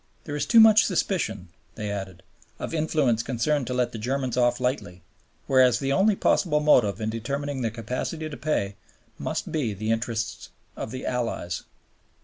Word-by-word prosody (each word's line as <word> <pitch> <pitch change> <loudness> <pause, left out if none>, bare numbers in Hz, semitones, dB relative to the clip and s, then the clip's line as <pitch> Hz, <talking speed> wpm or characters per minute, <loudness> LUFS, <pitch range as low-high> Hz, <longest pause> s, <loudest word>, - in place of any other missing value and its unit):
"There 145 - -5
is 145 - -2
too 230 - +6
much 220 -1 +8
suspicion," 110 - -1 0.3
they 105 -2 -4
added, 95 -3 -6 0.3
"of - - -5
influences 155 -7 +1
concerned 130 +3 0
to 125 - -2
let 125 -1 +1
the 115 - -6
Germans 130 +2 -2
off 120 -1 +2
lightly, 125 - -2 0.4
whereas 130 -3 +5
the 135 +1 -1
only 200 +5 +4
possible 155 -5 +2
motive 120 -9 +3
in 110 0 -2
determining 140 +4 -3
their 115 - 0
capacity 125 +8 -4
to 150 - -7
pay 100 -11 -2 0.4
must - - -3
be 125 -10 -1
the 110 +3 -2
interests 115 -1 -2 0.3
of - - -5
the 130 +3 -6
Allies." 115 -8 -3
125 Hz, 165 wpm, -25 LUFS, 110-150 Hz, 0.4 s, much